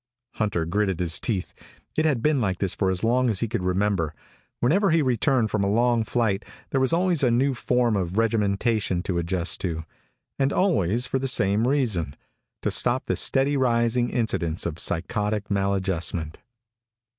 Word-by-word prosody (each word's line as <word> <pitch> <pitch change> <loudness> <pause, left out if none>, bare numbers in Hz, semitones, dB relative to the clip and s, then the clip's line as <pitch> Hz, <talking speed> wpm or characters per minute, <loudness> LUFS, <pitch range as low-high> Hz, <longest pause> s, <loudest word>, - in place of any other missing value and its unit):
Hunter 100 -7 -1
gritted 95 +1 -1
his 85 -2 +1
teeth. 100 -6 -3 0.4
It 155 - +1
had 135 -7 +1
been 150 -4 +2
like 95 -5 -1
this 95 -1 0
for 95 - 0
as 95 +1 -1
long 125 +2 +2
as 105 -4 0
he 115 - 0
could 105 - -3
remember. 90 -3 0 0.4
Whenever 190 - +2
he 165 -2 +3
returned 125 -2 +1
from 105 -2 0
a 100 - +1
long 120 +2 +2
flight 110 -3 -1 0.3
there 135 - +1
was 130 - +2
always 175 -1 +1
a 130 - +3
new 130 +4 +2
form 125 -2 +1
of 95 0 -2
regimentation 105 -3 0
to 90 -2 -1
adjust 85 +1 -2
to. 80 -3 -3 0.6
And 135 0 +2
always 125 - +1
for 130 +1 -1
the 135 - -2
same 110 -2 +2
reason 110 - -1 0.5
to - - 0
stop 125 +2 +1
the - - -1
steadily 140 +1 +2
rising 120 -1 +1
incidence 85 -8 -1
of 85 -1 -4
psychotic 105 +4 -1
maladjustment. 95 -5 -1
110 Hz, 170 wpm, -24 LUFS, 95-125 Hz, 0.6 s, he